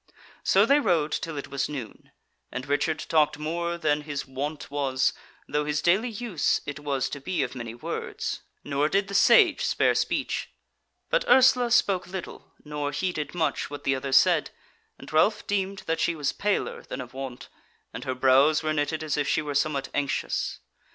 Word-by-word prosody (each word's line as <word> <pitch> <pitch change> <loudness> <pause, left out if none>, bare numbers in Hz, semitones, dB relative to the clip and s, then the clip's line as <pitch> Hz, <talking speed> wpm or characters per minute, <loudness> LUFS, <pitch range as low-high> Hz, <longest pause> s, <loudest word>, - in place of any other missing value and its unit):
So - - +4
they 285 +1 +5
rode 170 - +1
till 165 -1 -3
it 140 - -6
was 140 +1 -2
noon, 130 -7 -7 0.4
and 130 0 -5
Richard 145 +3 +1
talked 155 -2 +3
more 170 +3 -2
than 150 -3 +1
his 145 -2 -4
wont 140 +3 -5
was, 135 -2 +1 0.3
though 150 0 0
his 150 0 -1
daily 195 +8 +3
use 215 -7 0
it 145 0 -5
was 140 -3 -1
to 140 - -6
be 160 0 -1
of 125 - -4
many 120 -3 -6
words: 120 - -4 0.2
nor 145 +1 0
did 195 +2 +1
the - - -6
Sage 235 - +5
spare - - +2
speech; - - -1 0.6
but - - +3
Ursula 250 -1 +6
spoke 200 -7 +2
little, 185 -1 -8
nor 150 -1 -3
heeded 155 -1 -3
much 165 -2 -1
what 145 0 -7
the 135 - +2
others 135 0 +2
said, - - +4 0.5
and - - -12
Ralph 210 +7 +3
deemed 195 -1 -2
that 165 0 -1
she 170 - +1
was 145 -3 -1
paler 205 0 -1
than - - -7
of 125 -1 -8
wont, 130 -2 -7 0.5
and - - -6
her 130 - -3
brows 135 +4 +4
were 155 0 0
knitted 155 +1 -1
as 150 -2 -1
if 145 -1 0
she 155 - +1
were 145 -1 -4
somewhat 140 -1 0
anxious. 145 -2 -2
150 Hz, 185 wpm, -26 LUFS, 140-180 Hz, 0.6 s, Ursula